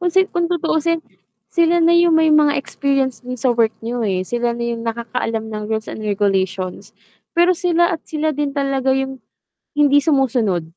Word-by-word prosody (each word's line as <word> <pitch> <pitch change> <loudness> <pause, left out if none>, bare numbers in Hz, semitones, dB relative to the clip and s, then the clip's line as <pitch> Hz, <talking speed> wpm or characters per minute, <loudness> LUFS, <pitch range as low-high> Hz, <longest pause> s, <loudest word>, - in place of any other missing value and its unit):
Kung 355 0 +1
si 380 - +6
kung 345 -1 0
tutuusin, 335 -1 0 0.5
sila 335 0 +3
na 335 - +5
yung 340 -1 +4
may 320 -1 +4
mga 300 -1 +4
experience 275 -2 -1
do'n 250 0 -6
sa 250 +1 +1
work 230 -2 +1
niyo, 240 +1 -3
eh, 185 -1 -1
sila 240 +3 -2
na 235 - -4
yung 235 -1 -3
nakakaalam 230 -1 -3
ng 210 0 -4
rules 220 -1 -3
and - - -7
regulations. 195 -3 -2 0.4
Pero 345 +2 +5
sila 345 -1 +2
at 325 - -3
sila 310 0 -1
din 290 -1 -3
talaga 270 -1 0
yung, 265 -1 -3 0.6
hindi 290 -1 +4
sumusunod. 250 - +1
270 Hz, 180 wpm, -19 LUFS, 230-320 Hz, 0.6 s, si